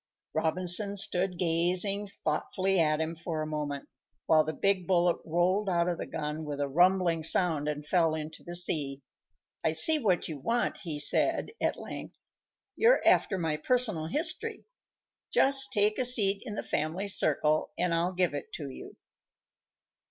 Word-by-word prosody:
Robinson 180 Hz, +5 st, +2 dB
stood 180 Hz, -1 st, 0 dB
gazing 180 Hz, +4 st, +1 dB
thoughtfully 190 Hz, +2 st, -1 dB
at 155 Hz, -2 st, +2 dB
him 160 Hz, +1 st, -2 dB
for 165 Hz, -1 st, -5 dB
a -, -, -4 dB
moment, 150 Hz, -2 st, -5 dB, 0.4 s
while 155 Hz, -1 st, +4 dB
the 155 Hz, -, -3 dB
big 190 Hz, +1 st, 0 dB
bullet 175 Hz, -2 st, +2 dB
rolled 180 Hz, +5 st, 0 dB
out 170 Hz, -1 st, +1 dB
of 175 Hz, -2 st, -2 dB
the -, -, -5 dB
gun 150 Hz, 0 st, -5 dB
with 145 Hz, -2 st, -6 dB
a 145 Hz, -, -1 dB
rumbling 175 Hz, +2 st, +2 dB
sound 160 Hz, -3 st, +1 dB
and 150 Hz, 0 st, -4 dB
fell 165 Hz, -1 st, +1 dB
into 155 Hz, 0 st, -7 dB
the 175 Hz, -, -6 dB
sea. 145 Hz, -6 st, -1 dB, 0.6 s
"I 160 Hz, -, +1 dB
see 305 Hz, -, +6 dB
what 190 Hz, -, 0 dB
you 155 Hz, -3 st, -7 dB
want," 235 Hz, -, -1 dB
he 160 Hz, -5 st, -5 dB
said, 145 Hz, -, +2 dB
at -, -, 0 dB
length. -, -, -9 dB, 0.6 s
"You're 475 Hz, +3 st, +3 dB
after 195 Hz, -, +3 dB
my 160 Hz, -3 st, -2 dB
personal 210 Hz, -3 st, +1 dB
history. 315 Hz, -, -2 dB, 0.7 s
Just 270 Hz, 0 st, +4 dB
take 210 Hz, -1 st, +1 dB
a 255 Hz, -, +1 dB
seat 205 Hz, -5 st, +3 dB
in 210 Hz, -, -5 dB
the -, -, -4 dB
family 165 Hz, +7 st, -3 dB
circle 155 Hz, -4 st, +1 dB
and 175 Hz, -1 st, 0 dB
I'll 170 Hz, +2 st, 0 dB
give 180 Hz, -3 st, 0 dB
it 145 Hz, -, -6 dB
to 140 Hz, -3 st, -6 dB
you." -, -, -12 dB
175 Hz, 165 wpm, -28 LUFS, 155-195 Hz, 0.7 s, see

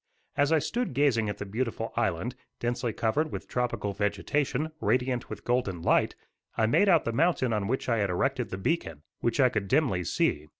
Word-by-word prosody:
As 145 Hz, +2 st, +2 dB
I 160 Hz, -, +5 dB
stood 230 Hz, -, -2 dB
gazing 120 Hz, -6 st, +2 dB
at 105 Hz, -, -4 dB
the -, -, -5 dB
beautiful 115 Hz, +4 st, -3 dB
island, 100 Hz, +10 st, 0 dB, 0.3 s
densely 120 Hz, 0 st, -1 dB
covered 145 Hz, +9 st, 0 dB
with -, -, -6 dB
tropical 120 Hz, -5 st, -1 dB
vegetation, 125 Hz, +9 st, -1 dB
radiant 125 Hz, +3 st, 0 dB
with -, -, -8 dB
golden 110 Hz, -9 st, 0 dB
light, -, -, +3 dB, 0.4 s
I 110 Hz, -, +3 dB
made 195 Hz, -, +4 dB
out 170 Hz, -4 st, +4 dB
the 115 Hz, -, -1 dB
mountain 140 Hz, -4 st, +2 dB
on 105 Hz, -2 st, 0 dB
which 130 Hz, +4 st, -1 dB
I 115 Hz, -2 st, +2 dB
had 100 Hz, -1 st, +1 dB
erected 125 Hz, +7 st, 0 dB
the 95 Hz, -, -4 dB
beacon, 95 Hz, -, -2 dB, 0.2 s
which 120 Hz, +3 st, 0 dB
I 130 Hz, -2 st, +6 dB
could 105 Hz, -5 st, -2 dB
dimly 95 Hz, -, +2 dB
see. 75 Hz, -2 st, 0 dB
120 Hz, 195 wpm, -28 LUFS, 105-135 Hz, 0.4 s, I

